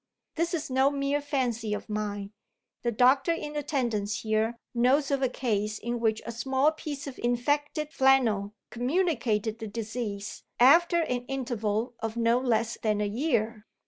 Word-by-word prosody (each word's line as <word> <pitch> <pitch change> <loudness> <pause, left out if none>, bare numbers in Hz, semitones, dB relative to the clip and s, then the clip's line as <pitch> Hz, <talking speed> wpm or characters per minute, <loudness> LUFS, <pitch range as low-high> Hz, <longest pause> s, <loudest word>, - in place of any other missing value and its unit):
This 335 +1 0
is 300 -5 -4
no 265 +1 +4
mere 280 0 -1
fancy 245 -7 -1
of - - -7
mine; 205 -2 -3 0.5
the 240 - 0
doctor 255 +8 +4
in 300 -2 -5
attendance 240 -8 -1
here 220 +1 0 0.2
knows 265 +4 +3
of 275 -1 +1
a 260 - +2
case 215 -4 -1
in 235 +2 -3
which 220 -1 0
a 235 - -4
small 265 +5 +1
piece 300 -2 -6
of 275 -3 -8
infected 290 +5 0
flannel 230 -8 +3 0.2
communicated 240 - 0
the 220 - -5
disease 210 -1 -5 0.2
after 340 +7 +6
an 250 -5 -2
interval 240 -3 -2
of 225 +1 -4
no 235 +1 +3
less 230 -2 0
than 215 -2 +1
a 210 - +1
year. 225 -2 -1
240 Hz, 155 wpm, -28 LUFS, 220-275 Hz, 0.5 s, after